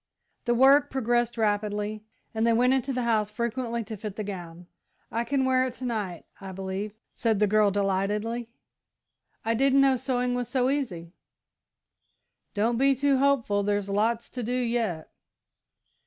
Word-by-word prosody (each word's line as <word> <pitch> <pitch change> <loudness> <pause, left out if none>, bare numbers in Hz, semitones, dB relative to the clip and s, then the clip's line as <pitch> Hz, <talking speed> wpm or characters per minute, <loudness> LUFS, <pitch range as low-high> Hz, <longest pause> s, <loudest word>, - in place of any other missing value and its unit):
The 240 - +2
work 275 +3 +6
progressed 240 -2 0
rapidly, 210 0 -1 0.3
and 225 +1 +1
they 230 - +4
went 250 +3 +4
into 265 0 0
the 250 -1 -1
house 220 -3 +1
frequently 235 +1 -2
to 220 0 -7
fit 210 -1 -7
the 215 - -4
gown. 175 -3 -7 0.5
"I 230 +1 0
can 265 +2 0
wear 260 0 +3
it 255 -1 -3
to 260 - -7
night, 205 -8 -3 0.2
I 190 -1 -7
believe," 195 +2 -5 0.2
said 225 -3 0
the 210 - +3
girl, 210 0 +3
delightedly. 205 +4 -1 1.0
"I 225 - +2
didn't 270 +3 +4
know 270 -1 +4
sewing 250 -1 -1
was 245 -1 -2
so 255 0 +1
easy!" 180 -12 -3 1.4
"Don't 225 +3 +1
be 275 0 +4
too 275 0 +2
hopeful 260 -7 +2
there's 205 0 -1
lots 225 +3 0
to 250 - -5
do 245 +2 -2
yet." 230 -9 -1
230 Hz, 160 wpm, -27 LUFS, 205-255 Hz, 1.4 s, work